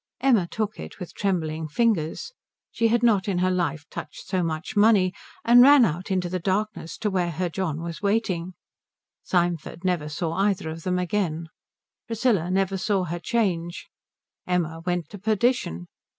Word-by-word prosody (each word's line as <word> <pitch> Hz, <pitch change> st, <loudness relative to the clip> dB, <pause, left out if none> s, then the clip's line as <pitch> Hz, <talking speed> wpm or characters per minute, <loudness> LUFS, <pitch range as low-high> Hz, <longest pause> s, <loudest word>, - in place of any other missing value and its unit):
Emma 240 Hz, -9 st, +3 dB
took 215 Hz, +2 st, -3 dB
it -, -, -8 dB
with 180 Hz, -, -7 dB
trembling 160 Hz, -5 st, -1 dB
fingers 220 Hz, -, 0 dB, 0.4 s
she 230 Hz, 0 st, +2 dB
had 235 Hz, +1 st, +2 dB
not 210 Hz, -5 st, +3 dB
in 195 Hz, -3 st, 0 dB
her 185 Hz, +1 st, +2 dB
life 170 Hz, -4 st, -1 dB
touched 145 Hz, -, -8 dB
so 185 Hz, -, 0 dB
much 160 Hz, +2 st, -3 dB
money 205 Hz, -3 st, +4 dB, 0.3 s
and 240 Hz, +1 st, +8 dB
ran 275 Hz, -1 st, +8 dB
out 180 Hz, +3 st, -3 dB
into 185 Hz, -2 st, 0 dB
the 185 Hz, +1 st, -2 dB
darkness 195 Hz, -1 st, -2 dB
to 210 Hz, -2 st, -1 dB
where 180 Hz, -2 st, 0 dB
her 175 Hz, +2 st, -2 dB
John 165 Hz, -3 st, -3 dB
was 170 Hz, -1 st, -6 dB
waiting. 190 Hz, -4 st, 0 dB, 0.7 s
Symford 175 Hz, -1 st, -1 dB
never 175 Hz, -5 st, 0 dB
saw 160 Hz, +2 st, -2 dB
either 195 Hz, -3 st, 0 dB
of 165 Hz, +1 st, -7 dB
them 180 Hz, +2 st, -1 dB
again. 170 Hz, -3 st, -1 dB, 0.6 s
Priscilla 225 Hz, -7 st, +1 dB
never 195 Hz, +1 st, +1 dB
saw 195 Hz, 0 st, 0 dB
her 175 Hz, 0 st, -4 dB
change. 175 Hz, -4 st, -1 dB, 0.6 s
Emma 165 Hz, -3 st, -1 dB
went 175 Hz, -3 st, 0 dB
to 205 Hz, -, -9 dB
perdition. 215 Hz, -, 0 dB
185 Hz, 165 wpm, -25 LUFS, 170-210 Hz, 0.7 s, and